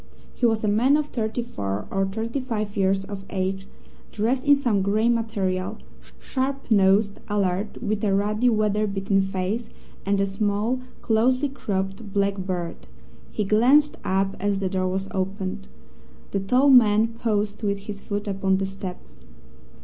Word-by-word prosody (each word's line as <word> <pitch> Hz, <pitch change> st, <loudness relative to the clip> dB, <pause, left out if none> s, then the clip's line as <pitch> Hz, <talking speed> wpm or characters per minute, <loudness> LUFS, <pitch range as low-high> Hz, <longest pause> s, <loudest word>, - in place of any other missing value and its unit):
He 245 Hz, -, +2 dB
was 225 Hz, -1 st, 0 dB
a -, -, +1 dB
man 240 Hz, +8 st, +4 dB
of 300 Hz, -, 0 dB
thirty 225 Hz, +1 st, -2 dB
four 100 Hz, -, -4 dB
or 195 Hz, 0 st, +1 dB
thirty 225 Hz, +6 st, -3 dB
five 215 Hz, -5 st, -3 dB
years 195 Hz, 0 st, +1 dB
of 200 Hz, -1 st, -7 dB
age, 190 Hz, 0 st, -2 dB, 0.4 s
dressed 240 Hz, +5 st, 0 dB
in 285 Hz, 0 st, +7 dB
some 240 Hz, -8 st, +1 dB
grey 210 Hz, +4 st, +2 dB
material, 200 Hz, -6 st, -1 dB, 0.4 s
sharp 270 Hz, -1 st, -3 dB
nosed, 200 Hz, 0 st, +4 dB
alert, 200 Hz, 0 st, -1 dB
with 215 Hz, -1 st, -1 dB
a 205 Hz, -, +2 dB
ruddy, 210 Hz, +5 st, +2 dB
weather 215 Hz, -1 st, +1 dB
beaten 195 Hz, 0 st, +1 dB
face, 195 Hz, +4 st, -2 dB, 0.3 s
and 200 Hz, 0 st, +1 dB
a 195 Hz, -, +3 dB
small, 205 Hz, +5 st, -1 dB, 0.2 s
closely 255 Hz, +5 st, +2 dB
cropped, 195 Hz, -4 st, -4 dB
black 200 Hz, 0 st, +2 dB
beard. 170 Hz, -, -4 dB, 0.4 s
He 210 Hz, -, -1 dB
glanced 255 Hz, +9 st, +4 dB
up 195 Hz, +1 st, 0 dB
as 205 Hz, 0 st, 0 dB
the 195 Hz, -1 st, -1 dB
door 185 Hz, -1 st, 0 dB
was 190 Hz, +1 st, -2 dB
opened. 195 Hz, +1 st, -3 dB, 0.6 s
The 200 Hz, -, 0 dB
tall 250 Hz, +8 st, +4 dB
man 225 Hz, -3 st, +6 dB
paused 215 Hz, -3 st, -2 dB
with 200 Hz, -2 st, -1 dB
his 200 Hz, 0 st, -7 dB
foot 205 Hz, +1 st, -4 dB
upon 195 Hz, -1 st, +1 dB
the 195 Hz, -, -1 dB
step. 190 Hz, -1 st, -6 dB
205 Hz, 155 wpm, -24 LUFS, 195-225 Hz, 0.6 s, in